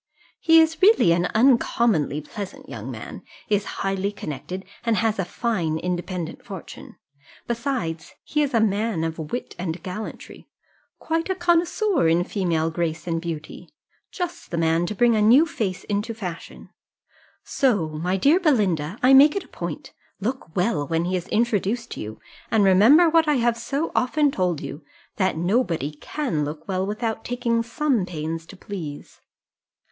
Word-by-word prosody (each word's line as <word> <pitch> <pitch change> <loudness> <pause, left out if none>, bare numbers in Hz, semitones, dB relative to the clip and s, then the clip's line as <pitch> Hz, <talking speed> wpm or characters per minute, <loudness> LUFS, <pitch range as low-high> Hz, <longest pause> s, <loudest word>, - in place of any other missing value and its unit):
He 325 0 +6
is 320 0 +2
really 390 - +6
an 175 +1 +2
uncommonly 225 - +3
pleasant 190 +6 -8
young - - -7
man, - - -8 0.3
is 205 -1 +1 0.2
highly 195 +1 -1
connected, 185 +1 -6 0.2
and 230 -1 +2
has 225 -2 +1
a 190 - 0
fine 175 -6 -1
independent 175 -1 -4
fortune. 190 -4 -10 0.5
Besides, 235 - -3
he 300 - 0
is 280 -4 0
a - - +5
man 210 -4 0
of 165 0 -3
wit 160 +11 -5
and 170 -1 -4
gallantry, 195 +4 -7 0.5
quite 330 +2 -2
a 380 - +1
connoisseur 345 - +2
in 165 +2 +3
female 170 -5 -1
grace 165 -1 -2
and 165 -1 -1
beauty 165 +1 -7 0.4
just 350 -2 -5
the 170 - -3
man 165 +1 +2
to 210 - -4
bring 240 +1 +4
a 215 - +2
new 245 +9 +6
face 210 - -3
into 210 +3 -2
fashion: 180 -6 -8 0.7
so, 210 - +1
my 170 +5 -2
dear 290 - +4
Belinda, 200 - +1
I 260 +2 +6
make 285 +3 +7
it 395 - -2
a - - -19
point - - -6 0.3
look 215 -6 -4
well 180 -6 0
when 165 0 0
he 185 +1 -1
is 180 - -3
introduced 230 0 0
to - - -6
you, 110 +1 -7 0.3
and 220 -2 +3
remember, 220 - +6
what 325 0 +4
I 300 - +3
have 240 -2 +2
so 275 +7 -3
often 290 +3 +2
told 180 - -1
you, 150 - -7 0.3
that 190 -5 +1
nobody 175 - 0
can 155 - -3
look 150 +1 -6
well 190 0 -1
without 220 +1 -3
taking 240 -1 0
some 240 -3 0
pains 165 -1 -5
to 195 - -12
please. 165 -8 -8
200 Hz, 160 wpm, -23 LUFS, 170-245 Hz, 0.7 s, make